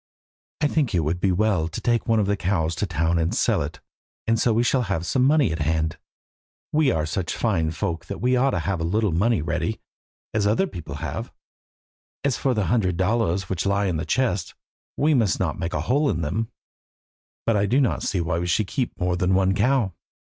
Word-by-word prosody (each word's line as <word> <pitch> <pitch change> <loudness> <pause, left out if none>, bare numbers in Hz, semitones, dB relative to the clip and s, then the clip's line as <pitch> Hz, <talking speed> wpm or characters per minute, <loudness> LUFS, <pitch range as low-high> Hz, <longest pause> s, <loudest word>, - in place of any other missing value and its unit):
"I 150 - +4
think 145 - 0
it 85 - +3
would 80 +3 -1
be 95 +1 +2
well 90 -3 +1
to 85 - -5
take 120 -1 0
one 115 -1 +3
of 105 - +2
the 100 +1 +1
cows 85 -4 0
to 105 - -1
town 85 0 +1
and 80 0 0
sell - - +2
it, - - -5 0.5
and 115 0 +2
so 120 - +3
we 115 +2 +2
shall 130 +1 +2
have 85 -3 -1
some 125 +7 +1
money 140 - +4
at 80 - -3
hand. 80 0 0 0.7
We 150 -2 +4
are 80 -10 0
such 80 +2 -3
fine 90 -9 +1
folk 85 0 -3
that - - -5
we 125 +4 +2
ought 130 +2 +3
to - - 0
have 95 -4 -1
a - - 0
little 105 +4 +1
ready 105 +4 +2
money, - - -2 0.5
as 105 -1 +2
other 110 - +2
people - - -7
have. - - -5 0.9
As 140 -4 +1
for 130 -3 0
the 105 -3 +1
hundred 90 -2 +1
dollars 95 -2 +1
which 95 0 -2
lie 100 +1 +1
in 90 -4 0
the 80 - -2
chest, 120 -8 0 0.4
we 150 +2 +3
must 115 -8 +2
not 80 -5 -1
make 85 0 -3
a 75 - 0
hole 140 - +2
in 85 - -1
them, 110 +9 -2 1.0
but 115 - +2
I 100 0 +2
do 130 +7 +3
not 130 -5 +1
see 95 -4 -1
why 85 0 -1
we 90 - -2
should 95 +5 +1
keep 125 +5 -3
more 90 0 +1
than 90 +1 +1
one 95 0 +3
cow. 110 -1 +2
100 Hz, 220 wpm, -24 LUFS, 85-120 Hz, 1.0 s, I